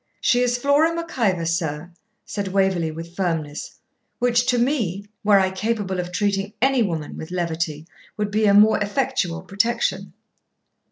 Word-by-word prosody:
'She 245 - +3
is 245 0 +2
Flora 285 +6 +3
Mac 335 0 -5
Ivor, 185 -7 +1
sir,' 165 0 -2 0.3
said 200 -2 -4
Waverley, 190 -3 +1
with 165 +2 -8
firmness, 165 -6 -3 0.4
'which 245 0 +2
to 245 - +3
me, 230 - 0 0.2
were 205 -1 +5
I 190 -1 +1
capable 190 -1 -2
of 180 0 -4
treating 200 +2 -1
ANY 265 0 +3
woman 165 -8 -2
with 160 - -7
levity, 165 -3 -2 0.3
would 210 -1 -2
be 215 +1 +2
a 200 - +5
more 215 +2 +6
effectual 205 -6 -1
protection.' 230 - -1
200 Hz, 155 wpm, -22 LUFS, 175-240 Hz, 0.4 s, more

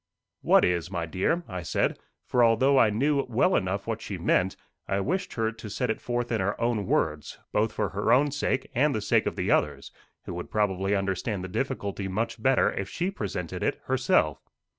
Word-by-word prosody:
"What - - +5
is, 90 -1 0
my 85 -3 -2
dear?" 95 - 0
I 90 -4 -5
said; 80 - 0 0.3
for 125 - +3
although 130 +4 +4
I 115 - +6
thought - - -3
I - - -1
knew 140 +2 +2
well 125 +11 +3
enough 95 +2 -1
what 115 -1 -3
she 100 - -5
meant, 90 +2 +1 0.3
I 95 - 0
wished 180 - -2
her 115 -1 0
to 110 -1 -9
set 125 +3 -1
it - - -5
forth 120 0 -2
in 115 -4 +1
her 100 +2 -1
own 115 -4 0
words, 75 -1 -1
both 105 +1 +1
for 105 -3 -1
her 100 +3 0
own 140 +4 +4
sake, 135 -2 -1
and 140 +3 +2
the 110 - -1
sake 100 - +2
of - - -2
the - - -1
others, - - 0 0.3
who - - -5
would 90 0 -6
probably 100 -1 +1
understand 95 +1 -2
the - - -4
difficulty 100 -4 -3
much 110 +4 -3
better 130 +1 +3
if 100 -1 -4
she 180 +2 -2
presented 95 - -4
it - - 0
herself. 75 -2 +1
105 Hz, 210 wpm, -27 LUFS, 95-125 Hz, 0.3 s, I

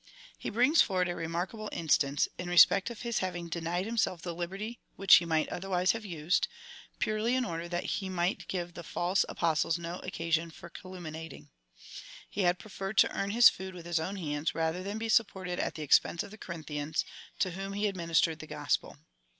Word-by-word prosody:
He - - -4
brings 255 +9 +5
forward 185 -2 +2
a 175 - -2
remarkable 180 +7 -3
instance, 145 -3 +2
in 180 -1 -4
respect 180 +3 +6
of 235 -1 -8
his 235 -2 0
having 175 -2 -3
denied 170 +2 -2
himself 215 -6 -1
the 175 - -3
liberty 195 +7 -5 0.2
which 195 -1 +5
he 170 - 0
might 160 -2 +1
otherwise 185 0 +1
have 225 -1 -4
used, 170 -2 0 0.5
purely 215 +3 +1
in 255 -1 +1
order 170 -3 -4
that 175 0 -2
he 190 -2 -2
might 180 0 -1
give 175 -2 -3
the 170 - -7
false 175 +3 +1
Apostles 165 0 +1
no 170 +1 -5
occasion 165 0 -1
for 170 +1 -12
calumni 180 -4 -8
ating. - - -13 0.8
He 205 - -3
had 175 -1 +3
preferred 195 +1 -6
to - - +6
earn 195 - -1
his 235 +3 +8
food 190 0 -1
with 170 -2 -9
his 170 -1 0
own 185 +5 -3
hands, 150 -4 -2
rather 165 +2 0
than 200 +3 -4
be 225 +1 -3
supported 190 -5 +1
at - - -1
the 155 - -5
expense 150 +3 +3
of - - -11
the 215 - -11
Co 170 - -6
rinthians, 150 -1 -3 0.3
to 185 - +1
whom 195 +2 -5
he 205 +1 -1
administered 170 -4 +1
the 155 - -9
Gospel. 150 -1 -1
175 Hz, 200 wpm, -30 LUFS, 165-195 Hz, 0.8 s, his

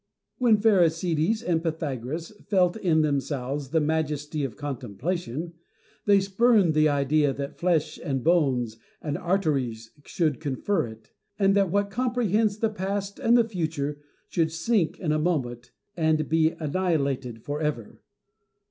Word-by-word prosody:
When 235 -4 +5
Pherecydes 180 -1 +2
and 170 -6 +1
Pythagoras 160 - -3 0.2
felt 180 -3 +3
in 170 -7 +2
themselves 140 -1 -2
the 160 - +2
majesty 150 -1 -1
of 125 -6 -3
contemplation, 145 - -4 0.5
they 200 -1 +5
spurned 195 -2 +3
the 155 0 +4
idea 145 0 +2
that 140 +2 -6
flesh 170 -4 +1
and 135 -3 -2
bones 130 -10 +2 0.2
and 145 -2 -3
arteries 140 -12 -1
should 155 -6 0
confer 155 +2 -1
it; 110 0 -13 0.3
and 195 -1 +3
that 195 -2 +3
what 200 +2 0
com 250 +3 -1
prehends 215 -2 +1
the 225 - +3
past 200 0 -3
and 235 +1 +4
the 230 -1 +3
future 155 -7 -3 0.3
should 160 -2 0
sink 165 +2 0
in 160 -5 -1
a 155 - +1
moment 125 -8 -2 0.2
and 160 -2 +1
be 160 0 +2
annihilated 140 -8 -1
for 145 +2 -4
ever. 150 -8 -3
160 Hz, 140 wpm, -26 LUFS, 140-190 Hz, 0.5 s, When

